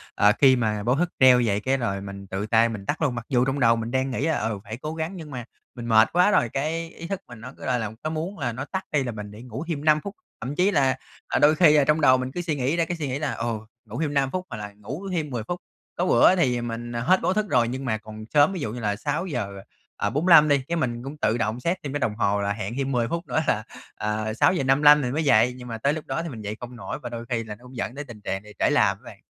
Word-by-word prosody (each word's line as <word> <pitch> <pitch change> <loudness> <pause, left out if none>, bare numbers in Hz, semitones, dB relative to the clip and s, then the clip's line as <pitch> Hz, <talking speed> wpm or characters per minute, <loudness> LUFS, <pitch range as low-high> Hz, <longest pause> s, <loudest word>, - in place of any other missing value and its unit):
ờ, 105 - +5
khi 130 -2 +7
mà 110 -3 -1
báo 120 +4 +2
thức 175 +4 0
treo 130 -1 +7
vậy, 100 -2 +1
cái 130 +5 0
rồi 100 -6 -2
mình 100 0 -8
tự 95 +2 -3
tay 115 +1 +4
mình 105 -4 -6
tắt 150 - -2
luôn, 140 -6 +1
mặc 120 -1 -5
dù 125 -2 +3
trong 135 +1 -1
đầu 115 -3 +5
mình 115 0 -4
đang 130 +1 0
nghĩ 135 - -1
là 160 - +1
"Ừ, 105 -3 -2
phải 110 +1 -7
cố 155 +5 -5
gắng" 160 +4 -3
nhưng 160 -5 -9
mà 125 -3 -6 0.3
mình 120 - -7
mệt 110 -1 +5
quá 180 +4 +4
rồi, 120 - +3
cái 160 +5 -2
ý 165 - -9
thức 195 0 -3
mình 120 -2 -12
nó 125 +3 -9
cứ, - - -9
gọi 125 -1 +1
là, 110 -2 -3
có 155 - -1
muốn 165 +5 -4
là 120 -4 -1
nó 130 +4 -5
tắt 190 +4 -4
đi 145 -3 +2
là 125 - -3
mình 105 -2 -7
để 105 - -11
ngủ 125 +4 -6
thêm 155 -3 -3
5 155 -1 +4
phút, 200 +4 -7 0.3
thậm 130 +5 -4
chí 190 +3 +3
là, 135 -6 +2 0.3
ờ, - - 0
đôi 150 +2 +5
khi, 155 -2 +6
ờ, 145 - +5
trong 150 +1 +3
đầu 130 -3 +6
mình 130 0 -4
cứ 175 - -3
suy 165 -4 -2
nghĩ 135 +3 0
ra 170 -1 +1
cái 175 +1 -4
suy 150 -3 -3
nghĩ 130 +1 -2
là 145 -2 -1
"Ồ, 115 -2 -3 0.2
ngủ 115 +7 -6
thêm 150 -2 -1
5 135 -1 +1
phút 185 0 -3
hoặc 120 - -6
là 105 -1 -7
ngủ 130 - -7
thêm 160 -4 -2
10 120 -5 -3
phút." 175 +8 -4 0.4
Có 175 - +1
bữa 185 - +5
thì, 125 -9 +2
à, - - -4
mình, 120 0 -5
ờ, 120 - -3
hết 185 +9 +3
báo - - +1
thức 215 +1 0
rồi 120 -2 +3
nhưng 130 +3 -4
mà 110 -3 0
còn 110 0 -10
sớm, 150 +5 +5
ví 185 - -4
dụ 130 -8 -3
như 125 - -6
là 105 -3 -1
6:45 145 - +1
đi, 140 -1 +3
cái 170 - -1
mình 120 -7 -2
cũng 140 +3 -7
tự 120 -5 +1
động 115 0 -1
set 170 +8 0
thêm 140 -1 -5
cái 145 - -1
đồng 110 -5 -1
hồ 100 -2 +1
là 100 0 0
hẹn 105 +2 -5
thêm 135 0 -1
10 120 -3 +1
phút 170 +6 -4
nữa - - +1
là, 110 - +1 0.3
ờ, 110 +1 -2
6:55 145 +1 +5
thì 125 -3 -2
mới 155 +4 -1
dậy, 125 -3 +4
nhưng 125 -1 -10
mà 115 -1 -5
tới 140 +6 +1
lúc 155 - -6
đó 165 - -2
thì 170 - -5
mình 115 -6 -8
dậy 105 +1 -4
không 125 0 -8
nổi 120 - -6
và - - -4
đôi 115 0 -6
khi 115 -2 -1
là 105 -1 -7
nó 120 - -22
cũng 125 +1 -13
dẫn 120 - -3
đến 145 +1 -6
tình 110 -3 -11
trạng 95 0 -3
bị 105 - -13
trễ - - +3
làm - - +3
á - - -28
bạn. - - -12
130 Hz, 305 wpm, -25 LUFS, 115-150 Hz, 0.4 s, khi